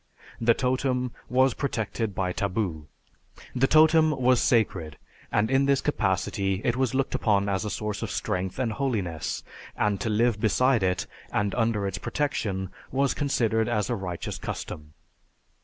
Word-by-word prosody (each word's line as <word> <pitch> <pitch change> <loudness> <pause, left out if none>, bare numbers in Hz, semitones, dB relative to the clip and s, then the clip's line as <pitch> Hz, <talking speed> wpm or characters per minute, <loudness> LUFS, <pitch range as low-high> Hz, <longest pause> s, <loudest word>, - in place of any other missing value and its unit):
The 115 0 +4
totem 125 -1 0 0.2
was 130 0 +3
protected 110 -5 -2
by 90 -1 -1
taboo. 90 -7 -2 0.7
The 130 +1 +3
totem 155 +1 +6
was 125 -1 +4
sacred 95 - +1 0.3
and 110 +4 +1
in 135 +1 +3
this 140 -1 +3
capacity 95 -6 0
it 120 - +2
was 130 0 0
looked 135 0 0
upon 100 -2 +2
as 100 +1 -1
a - - -2
source 105 -1 -3
of - - -3
strength 95 -3 -2
and 125 -3 0
holiness, 105 - -2 0.3
and 105 -2 +1
to 115 - -1
live 110 0 +2
beside 125 +2 +3
it 90 -1 0 0.3
and 105 -1 0
under 115 -4 +1
its 95 - -3
protection 100 -10 -2 0.2
was 135 +1 +2
considered 115 -6 +1
as 105 -4 0
a - - +1
righteous 90 -3 -5
custom. 75 0 -6
110 Hz, 155 wpm, -26 LUFS, 95-130 Hz, 0.7 s, totem